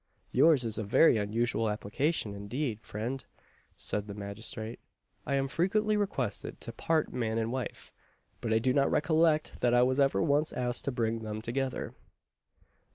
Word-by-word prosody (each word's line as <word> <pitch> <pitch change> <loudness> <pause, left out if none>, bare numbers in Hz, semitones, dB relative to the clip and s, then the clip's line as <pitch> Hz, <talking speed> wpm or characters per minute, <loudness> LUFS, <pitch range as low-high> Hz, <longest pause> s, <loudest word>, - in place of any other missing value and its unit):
"Yours 155 -5 +5
is 115 -1 -2
a - - -1
very 115 +6 +5
unusual 115 +2 0
application, 105 +3 -1
indeed, 110 +3 -3
friend," 120 +6 -4 0.5
said 105 0 -3
the 100 - -6
magistrate; 110 +3 -6 0.5
"I 140 - +1
am 135 0 +1
frequently 210 +8 +1
requested 135 - -2
to - - -6
part 160 -2 0
man 115 -3 -1
and 115 0 0
wife, 130 0 -5 0.5
but 115 - -2
I 110 - +4
do 125 +3 +2
not 140 0 +3
recollect 155 0 +2
that 120 0 +3
I 120 - +6
was 130 +2 +2
ever 135 +2 +3
once 150 0 +2
asked 125 -1 -2
to 140 - 0
bring 115 -2 -1
them 110 -1 -5
together." 130 +4 -3
120 Hz, 160 wpm, -30 LUFS, 110-140 Hz, 0.5 s, I